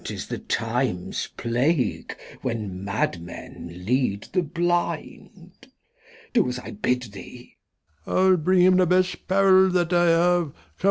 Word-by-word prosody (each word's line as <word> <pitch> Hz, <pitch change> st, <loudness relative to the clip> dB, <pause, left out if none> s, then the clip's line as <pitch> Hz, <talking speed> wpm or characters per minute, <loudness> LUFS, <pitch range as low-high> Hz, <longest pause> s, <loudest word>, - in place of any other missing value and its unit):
'Tis -, -, -6 dB
the -, -, -4 dB
Time's -, -, -2 dB
Plague 125 Hz, +5 st, -1 dB, 0.2 s
when 105 Hz, -6 st, -4 dB
Mad 100 Hz, -3 st, -1 dB
Men 85 Hz, 0 st, -9 dB, 0.2 s
lead 120 Hz, -4 st, 0 dB
the 185 Hz, -, +3 dB
Blind. 170 Hz, 0 st, -3 dB, 0.7 s
Do -, -, +3 dB
as 125 Hz, -, -4 dB
I 125 Hz, -, -8 dB
bid 125 Hz, -12 st, -1 dB
thee. 120 Hz, +5 st, -12 dB, 0.5 s
Old -, -, 0 dB
M. 190 Hz, -, +4 dB
I'U 185 Hz, -, +4 dB
bring 180 Hz, +3 st, +3 dB
him 185 Hz, 0 st, +5 dB
the 185 Hz, -1 st, +4 dB
best 185 Hz, +1 st, +1 dB
'Parrel 190 Hz, 0 st, +5 dB
that 180 Hz, -1 st, 0 dB
I 175 Hz, 0 st, +4 dB
have. 170 Hz, -2 st, +2 dB
170 Hz, 145 wpm, -24 LUFS, 125-180 Hz, 0.7 s, him